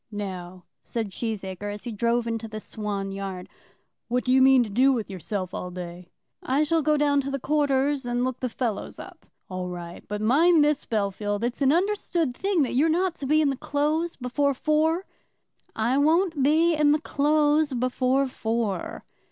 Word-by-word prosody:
"Now," 185 -3 -6 0.2
said 225 -4 -4
Cheesacre, 205 -2 -4
as 205 0 -7
he 240 - -5
drove 235 +2 0
into 230 -1 -3
the 215 0 -6
Swan 205 -3 -4
yard, 195 -2 -6 0.6
"what 250 +1 0
do 255 - +1
you 260 - +5
mean 265 -1 +6
to 220 - -6
do 260 +6 +4
with 225 -6 -2
yourself 185 0 -4
all 180 - -4
day?" 175 0 -8 0.3
"I 275 +4 +1
shall 325 +1 +1
go 305 0 +2
down 285 -1 +3
to 275 - -5
the 275 - -2
quarters, 285 0 +1
and 245 0 -1
look 255 -1 -3
the 255 - -2
fellows 225 -3 -3
up." - - -12 0.2
"All 185 -1 -4
right. 175 -1 -8
But 210 0 -3
mind 300 +7 +5
this, 295 -1 0
Bellfield; 205 0 -1
it's 240 +3 -2
an 270 0 +4
understood 345 -6 0
thing, 385 -3 +1
that 260 - -2
you're 290 +6 +3
not 355 +2 +1
to 275 - -3
be 305 +2 +4
in 285 - +2
the - - -2
Close 310 +3 -1
before 275 +2 0
four?" 315 +6 +1 0.7
"I 240 +5 +1
won't 320 +1 +2
be 320 +5 +4
in 300 -1 +4
the 305 - +1
Close 300 0 +2
before 255 +2 +1
four!" 225 -6 -3
255 Hz, 185 wpm, -25 LUFS, 210-295 Hz, 0.7 s, mean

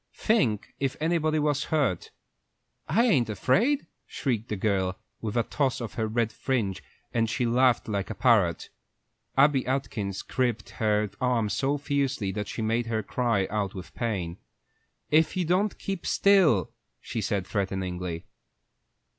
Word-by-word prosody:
Think, 125 - +1
if 135 -2 -1
anybody 155 -1 +1
was 150 -1 +1
hurt." 140 - 0 0.8
"I 230 +3 +4
ain't 130 - +3
afraid," 195 - +2 0.2
shrieked 115 -5 -2
the 105 - -1
girl, 95 -2 0 0.2
with 110 +1 -3
a 120 - +3
toss 135 0 0
of 115 -5 -5
her 110 -1 -1
red 115 0 0
fringe, 105 -8 -1 0.3
and 115 -2 +1
she 125 +1 0
laughed 120 0 +3
like 100 -3 -2
a 110 - -4
parrot. 100 - +2 0.7
Abby 135 -1 +5
Atkins 105 -7 -2
gripped 120 -5 -1
her 105 -2 +2
arm 120 -4 +1
so 135 +8 0
fiercely 140 -7 -1
that 105 +1 -4
she 115 - -4
made 115 +2 0
her 110 -1 -1
cry 115 -6 0
out 100 -2 -1
with 90 -2 -8
pain. 95 -8 -2 0.7
"If 160 +4 +3
you 180 - +1
don't 190 +5 +1
keep 195 -3 -4
still!" 185 - +4 0.3
she 115 - -4
said, 100 -2 -1
threateningly. 90 -4 -3
115 Hz, 145 wpm, -27 LUFS, 100-140 Hz, 0.8 s, Abby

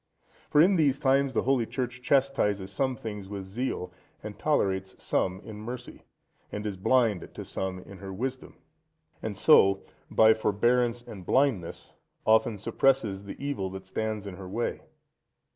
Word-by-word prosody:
For 150 - +4
in 185 +3 +5
these 140 -4 +3
times 135 -1 +2
the - - +2
Holy 125 -3 +2
Church 125 -1 -4
chastises 125 -8 +1
some 130 -2 0
things 105 -4 -7
with 100 -1 -5
zeal, 95 -3 -3 0.3
and 105 -1 -8
tolerates 95 -10 0
some 95 0 -1
in 110 -1 -9
mercy, 120 +3 -7 0.5
and 105 +1 -5
is 105 -2 -2
blind 110 0 +2
to - - -6
some 95 -1 -3
in 95 +1 -11
her 95 0 -7
wisdom, 130 +6 -5 0.6
and - - -4
so, 95 0 +5 0.3
by 110 0 +6
forbearance 120 +3 +1
and 100 -5 -10
blindness 120 -6 0 0.3
often 110 0 +4
suppresses 110 -2 +1
the 100 - -7
evil 140 -9 -3
that 95 0 -8
stands 110 +1 -3
in 95 -3 -7
her 95 -2 -8
way. 115 +5 -2
110 Hz, 155 wpm, -28 LUFS, 95-130 Hz, 0.6 s, by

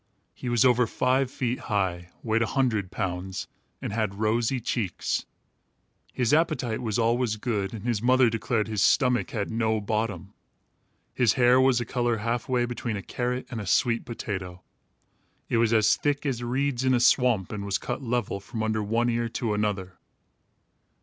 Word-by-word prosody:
He 125 - -6
was 120 0 +3
over 125 -1 +4
five 130 +3 +1
feet 125 -1 -2
high, 90 -4 -1
weighed 115 0 +1
a 115 - +2
hundred 115 -9 0
pounds, 95 -1 -4 0.4
and - - -3
had 105 -3 -1
rosy 115 +4 +1
cheeks. 105 -5 -2 0.8
His 125 +1 0
appetite 150 -8 +1
was 110 -4 -1
always 115 0 +1
good 105 -4 -2
and 110 -3 -7
his 115 -4 0
mother 130 +1 +4
declared 115 -1 0
his 105 -3 -1
stomach 125 0 +3
had 110 -7 -3
no 110 -1 +1
bottom. 105 -2 -3 0.8
His 120 -4 +3
hair 125 +1 +5
was 130 -2 +4
of 120 - -4
a - - -15
color 120 -2 +1
half 115 +3 -2
way 125 -1 +2
between 120 -2 -3
a 100 - -6
carrot 125 +1 -3
and 115 -3 -4
a 100 - -7
sweet 115 +6 +2
potato. 95 -6 -6 0.9
It - - +1
was 115 -1 +3
as 110 -2 +4
thick 145 0 -1
as 130 -4 -1
reeds 130 +1 -1
in 130 -1 +3
a - - +2
swamp 120 -6 +3
and 105 -2 -4
was 100 -1 0
cut - - -4
level, 120 -5 -1
from 110 +3 -5
under 110 0 0
one 115 +3 0
ear 120 -1 0
to 110 -1 -2
another. 100 -3 -2
115 Hz, 175 wpm, -26 LUFS, 105-125 Hz, 0.9 s, hair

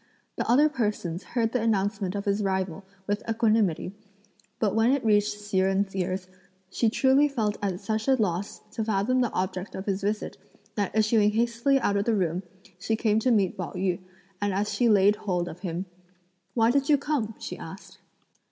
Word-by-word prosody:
The - - -3
other 280 +6 +6
persons 210 - -2
heard 230 -2 -1
the 250 - 0
announcement 200 -3 0
of 200 - -3
his 200 +1 +1
arrival, 190 -2 -1 0.2
with 205 +1 -1
equanimity, 215 -6 +1 0.6
but 210 -3 +1
when 225 +3 +3
it 275 -3 0
reached 210 -1 +3
Hsi 205 -2 -2
Jen's 195 +1 +1
ears, 185 0 -2 0.4
she 230 - +2
truly 265 +5 +4
felt 220 -7 -1
at 190 -3 -2
such 220 +2 -2
a 265 - +5
loss 200 -4 -2
to 220 - -3
fathom 220 +4 +1
the 245 - +1
object 185 +1 -3
of 190 - -5
his 195 -1 -1
visit 210 +2 -2 0.3
that 205 -1 -2
issuing 215 -1 +3
hastily 235 +4 +2
out 200 - +1
of 200 - 0
the 230 - +2
room, 180 -2 0 0.4
she 220 +4 0
came 215 -1 +2
to 255 - +1
meet 205 -6 +2
Pao 185 -4 -5
yü, 185 -2 -1 0.4
and 205 -2 0
as 205 +2 -1
she 240 -2 +2
laid 205 0 +5
hold 180 -4 -1
of 175 - -8
him: 180 0 -4 0.7
"Why 230 -1 +4
did 275 +2 +1
you 295 - +6
come?" 270 -7 -2
she - - -6
asked. - - -10
210 Hz, 190 wpm, -27 LUFS, 190-230 Hz, 0.7 s, other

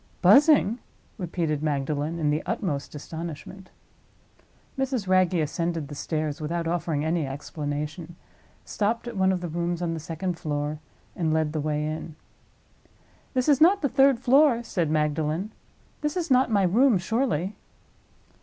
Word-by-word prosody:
"Buzzing?" 280 -6 +6 0.4
repeated 165 -4 -2
Magdalen, 150 +2 -1
in 150 -3 +1
the 150 - 0
utmost 145 -6 -3
astonishment. 165 +4 -8 1.1
Mrs. 265 -6 -2
Wragge 185 -1 +3
ascended 165 -1 -1
the - - -7
stairs, 155 +1 -3
without 165 +2 -2
offering 165 -3 -1
any 160 -2 0
explanation, 150 +4 -5 0.5
stopped 225 +3 -1
at 240 - -6
one 190 -1 +3
of 185 -1 -1
the 175 - -3
rooms 170 +1 -2
on 170 -2 -1
the 165 - -4
second 165 +2 -4
floor, 150 0 -3 0.4
and 160 -3 0
led 155 -1 0
the 155 - -1
way 150 0 -1
in. 155 0 -5 1.2
"This 255 +1 +1
is 290 -2 +4
not 370 +3 +5
the 280 - +2
third 270 -1 +4
floor," 260 -1 +4
said 175 -8 -1
Magdalen. 155 +5 0 0.5
"This 300 +4 -1
is 340 -5 -2
not 255 0 +4
my 205 -3 +3
room, 225 +5 +4
surely?" 195 - -1
170 Hz, 145 wpm, -26 LUFS, 155-215 Hz, 1.2 s, Buzzing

